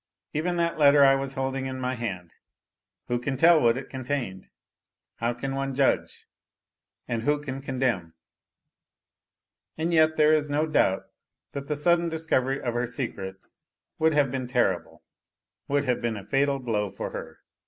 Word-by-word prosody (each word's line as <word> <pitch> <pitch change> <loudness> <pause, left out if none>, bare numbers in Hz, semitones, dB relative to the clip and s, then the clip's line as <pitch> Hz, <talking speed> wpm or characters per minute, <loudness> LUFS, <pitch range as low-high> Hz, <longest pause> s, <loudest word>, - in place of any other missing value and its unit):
Even 175 +4 -1
that 170 -1 0
letter 145 -1 +7
I 135 0 +7
was 135 0 -2
holding 135 0 -2
in 130 0 -5
my 130 0 -1
hand 95 -9 -5 0.7
who 120 0 0
can 135 +2 -3
tell 165 +2 +6
what 115 0 +3
it 135 - -6
contained! 125 -8 -4 0.7
How 115 +1 0
can 135 +2 -4
one 135 0 -2
judge? 135 0 0 0.8
and 115 -1 -2
who 145 +4 +1
can 135 -2 -6
condemn? 125 -12 -1 1.6
And 165 +2 -1
yet 155 -1 +4
there 155 0 +5
is 150 -1 +1
no 150 +2 +1
doubt 120 -11 +2 0.5
thai - - -2
the 140 +2 -3
sudden 170 +3 +2
discovery 140 -5 0
of 120 - -2
her 120 +1 -1
secret 115 -7 -5 0.6
would 160 -1 +3
have 140 -3 +3
been 130 -1 -3
terrible 120 -8 -1 0.6
would 140 0 +1
have 125 -3 0
been 115 -2 -1
a 100 - -9
fatal 140 0 +1
blow 110 -6 -1
for 100 - -6
her. 80 0 -8
135 Hz, 165 wpm, -26 LUFS, 120-145 Hz, 1.6 s, letter